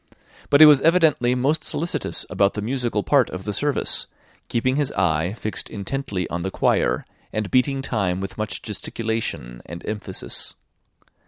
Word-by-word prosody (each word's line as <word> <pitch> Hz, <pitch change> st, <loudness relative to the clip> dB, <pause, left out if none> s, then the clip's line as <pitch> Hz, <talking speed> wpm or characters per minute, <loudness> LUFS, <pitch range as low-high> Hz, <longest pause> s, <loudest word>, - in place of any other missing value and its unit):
But 145 Hz, -, +5 dB
he -, -, +13 dB
was 145 Hz, -3 st, +7 dB
evidently 155 Hz, -7 st, +4 dB
most 140 Hz, +5 st, +1 dB
solicitous 170 Hz, +2 st, -2 dB
about 100 Hz, 0 st, +1 dB
the 105 Hz, -, -2 dB
musical 120 Hz, -3 st, -1 dB
part 140 Hz, -5 st, +3 dB
of 95 Hz, +1 st, -6 dB
the 105 Hz, -, -3 dB
service, 145 Hz, +6 st, 0 dB, 0.4 s
keeping 130 Hz, +2 st, +1 dB
his 145 Hz, -2 st, 0 dB
eye 90 Hz, -1 st, +1 dB
fixed 110 Hz, -1 st, -4 dB
intently 100 Hz, -3 st, -3 dB
on 85 Hz, -, -2 dB
the 95 Hz, -, -2 dB
choir, -, -, +1 dB, 0.3 s
and 110 Hz, -2 st, -3 dB
beating 135 Hz, +1 st, +2 dB
time 95 Hz, -8 st, -1 dB
with 95 Hz, -1 st, -5 dB
much 105 Hz, -3 st, -3 dB
gesticulation 105 Hz, -, -3 dB
and 85 Hz, 0 st, -8 dB
emphasis. 105 Hz, -2 st, -4 dB
110 Hz, 155 wpm, -23 LUFS, 95-135 Hz, 0.4 s, he